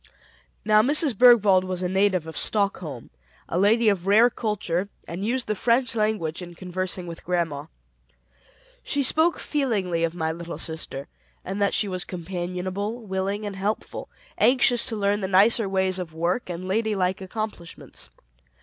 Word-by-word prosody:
Now, 215 0 +6
Mrs. 285 +1 +2
Bergwald 210 -5 +6
was 185 -1 -3
a - - +1
native 190 -2 +2
of 160 -1 -8
Stockholm, 180 - -2 0.4
a 170 - -1
lady 220 +4 +4
of 195 -3 +1
rare 225 +5 +6
culture, 200 -5 -2 0.2
and 175 +3 -5
used 245 +3 0
the 215 - -1
French 235 +3 +1
language 210 -7 -1
in 175 -1 -9
conversing 185 0 -3
with 170 -1 -8
grandma. 165 -5 -2 1.1
She 285 - -1
spoke 320 +5 +3
feelingly 205 - -1
of 165 0 -1
my 160 -2 -1
little 170 +1 -7
sister, 160 -4 -4 0.4
said 195 +2 -4
that 200 -1 +2
she 210 - +1
was 185 -2 -2
companionable, 185 +4 -4
willing, 195 +2 -2
and 205 -1 -5
helpful; 200 +3 -3 0.3
anxious 245 -1 +4
to 225 - -3
learn 205 0 +1
the 190 - -1
nicer 200 +3 +4
ways 190 -1 +1
of 165 -3 -6
work, 175 +7 -1
and 180 +1 -5
ladylike 195 -3 0
accomplishments. 190 -3 -7
190 Hz, 155 wpm, -25 LUFS, 180-215 Hz, 1.1 s, Now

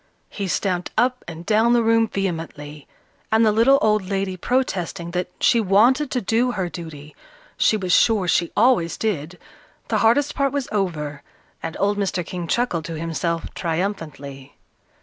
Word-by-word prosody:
He 200 -2 -4
stamped 180 -1 -1
up 250 +2 +1
and 170 0 -8
down 225 +2 +3
the 240 -1 +3
room 225 0 +3
vehemently, 160 -7 -5 0.4
and 220 +1 +4
the 215 - +4
little 230 +6 +5
old 215 -2 +3
lady 195 -1 -1
protesting 185 -6 -2
that 180 +1 -2
she 235 - +4
wanted 235 +9 +3
to 255 - -1
do 240 +3 +1
her 185 -5 -2
duty, 155 -4 -9 0.4
she 215 - +3
was 185 -3 -1
sure 210 -5 +3
she 170 0 +1
always 215 -7 +3
did, 180 -5 -3 0.5
the - - +1
hardest 280 +6 +3
part 275 -1 0
was 280 -2 -2
over, 155 -8 -2 0.4
and 165 - -5
old 205 +1 +1
Mr. 190 -3 -1
King 175 -1 -5
chuckled 180 -7 0
to 165 -1 -5
himself 165 +1 -3
triumphantly. 160 -6 -4
195 Hz, 160 wpm, -22 LUFS, 165-225 Hz, 0.5 s, little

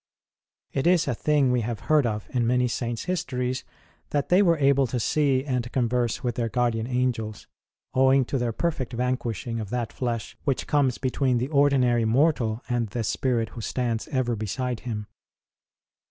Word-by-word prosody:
It 135 +4 0
is 175 -4 +4
a 130 - +1
thing 140 +1 +2
we 125 -1 +2
have 115 0 -4
heard 150 -5 +3
of 105 -2 -3
in 120 -2 +1
many 125 +1 +2
Saints 120 -1 -3
histories, 130 -8 -2 0.5
that 145 -1 -1
they 180 +3 +5
were 170 -4 +4
able 140 -2 +3
to 125 +1 -2
see 135 +1 +1
and 125 -3 -2
converse 120 -2 0
with 120 -2 0
their 115 0 -2
guardian 115 -1 0
angels, 125 -4 -2 0.5
owing 130 0 +4
to 135 - -2
their 120 -1 0
perfect 130 -2 -2
vanquishing 120 -2 -2
of 105 -3 -5
that 120 -1 -3
flesh 120 -3 -3
which 135 -3 0
comes 140 -4 +2
between 130 -1 +1
the 125 +3 -2
ordinary 135 -5 +3
mortal 120 -2 +2
and 120 -2 0
the 115 +3 -3
spirit 115 -1 0
who 115 - -8
stands 115 -1 -2
ever 130 -4 0
beside 115 +3 -3
him. 110 -4 -5
125 Hz, 170 wpm, -25 LUFS, 115-135 Hz, 0.5 s, they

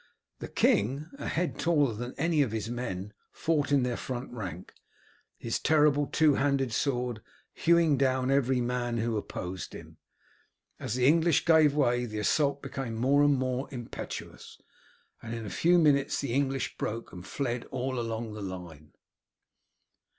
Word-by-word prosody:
The - - -6
king, 135 +9 +1
a - - -4
head 175 +1 -2
taller 145 -7 +2
than 120 +4 -6
any 160 0 +2
of 130 -6 +1
his 110 +1 -3
men, 105 -5 -4 0.2
fought 155 -3 0
in 140 -3 +4
their 125 -1 -1
front 125 0 -5
rank, 90 -7 -7 0.6
his 115 - -2
terrible 150 -2 +3
two 155 -2 +3
handed 135 -3 +1
sword 125 -3 -1 0.3
hewing 165 -4 +3
down 130 -1 +2
every 130 -2 +2
man 120 -1 -1
who 115 0 -1
opposed 95 -3 -5
him. - - -11 0.8
As 110 - -3
the 125 0 +2
English 165 +2 +4
gave 155 -3 +5
way 125 -4 +2
the 110 -1 -6
assault 140 +6 +1
became 135 -5 -4
more 135 +5 +3
and 145 -1 +5
more 130 +1 -2
impetuous, 120 -4 -8 0.6
and 115 0 -5
in 115 -1 -6
a 100 - -6
few 175 +2 +3
minutes 145 -4 +3
the 135 -4 -2
English 135 0 -1
broke 115 +2 -4
and 90 -1 -8
fled 125 +1 -3
all 130 0 -3
along 115 -1 -4
the 105 - -7
line. 85 -6 -8
130 Hz, 160 wpm, -29 LUFS, 115-145 Hz, 0.8 s, gave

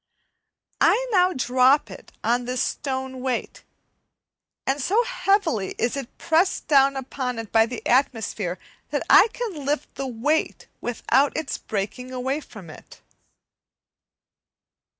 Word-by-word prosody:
I - - +4
now 365 -2 +4
drop 260 +1 +3
it - - -12
on 240 +1 +1
this 250 +1 -1
stone 260 -1 -4
weight, 255 -2 -3 1.0
and 275 +2 0
so 420 - +2
heavily 390 - 0
is 240 - 0
it 275 -4 -7
pressed 340 +3 +1
down 275 -2 +5
upon 260 -2 -4
it 225 -2 -6
by 225 0 +4
the 245 0 -7
atmosphere 225 -7 0 0.3
that - - -2
I - - +8
can 425 -12 -5
lift 290 +2 -2
the 275 0 -4
weight 265 +6 -1
without 260 +3 +1
its 315 -3 -3
breaking 215 +5 -4
away 260 +3 -2
from 210 - -12
it. - - -14
265 Hz, 130 wpm, -24 LUFS, 245-300 Hz, 1.0 s, I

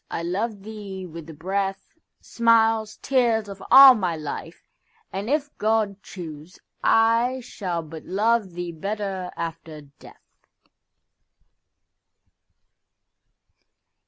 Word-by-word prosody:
I 165 - -4
love 200 +4 -3
thee 200 -3 -7
with 165 -2 -10
the 160 - -9
breath, 195 +4 -3 0.3
Smiles, 225 -2 +2
tears, 235 -5 +2
of 195 -1 -9
all 270 +1 +11
my 185 -7 -1
life; 155 +2 -7 0.5
and, 195 +4 -4
if 290 0 -1
God 215 -2 0
choose,I 225 - -1
shall 180 -8 -4
but 160 0 -10
love 210 -1 +1
thee 175 0 -5
better 195 +1 -4
after 165 -2 -6
death. 140 -1 -19
195 Hz, 100 wpm, -24 LUFS, 170-225 Hz, 0.5 s, all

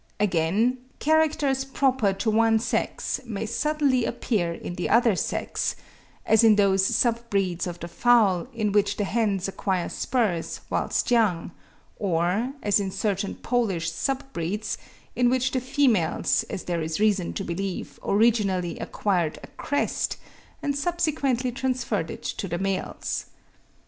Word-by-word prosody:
Again, 205 +6 +2 0.2
characters 305 -3 +2
proper 265 -5 +1
to 215 +3 -1
one 225 +1 +4
sex 225 +1 -2
may 225 -3 -4
suddenly 280 +1 +1
appear 195 -8 -1
in 170 - -6
the 175 - -3
other 230 -3 +4
sex; - - -2 0.5
as 220 +1 +5
in 220 -2 +7
those 195 -2 +3
sub 235 +2 +1
breeds 185 -3 0
of 175 -1 -6
the 170 - -6
fowl 215 -2 +3
in 215 -4 -1
which 205 0 +2
the 210 - 0
hens 200 -2 0
acquire 190 -2 -1
spurs 215 -10 -1
whilst - - 0
young; 205 -8 +2 0.5
or, 185 +6 0
as 205 0 +3
in 195 -1 -2
certain 200 0 -2
Polish 195 -9 -1
sub 265 +11 -2
breeds, 195 +6 -3 0.4
in 245 -1 +3
which 255 +1 +1
the 255 - 0
females, 245 - +2
as - - -4
there 170 -2 -2
is 160 +2 -2
reason 205 -5 +2
to 195 - -3
believe, 190 +1 -4
originally 200 -5 +2
acquired 175 -6 -1
a - - -8
crest, 285 -2 -1 0.5
and 285 -1 0
subsequently 285 -6 0
transferred 245 -8 -1
it - - -8
to 195 - -3
the 175 0 -2
males. 195 +1 -2
210 Hz, 145 wpm, -25 LUFS, 185-245 Hz, 0.5 s, in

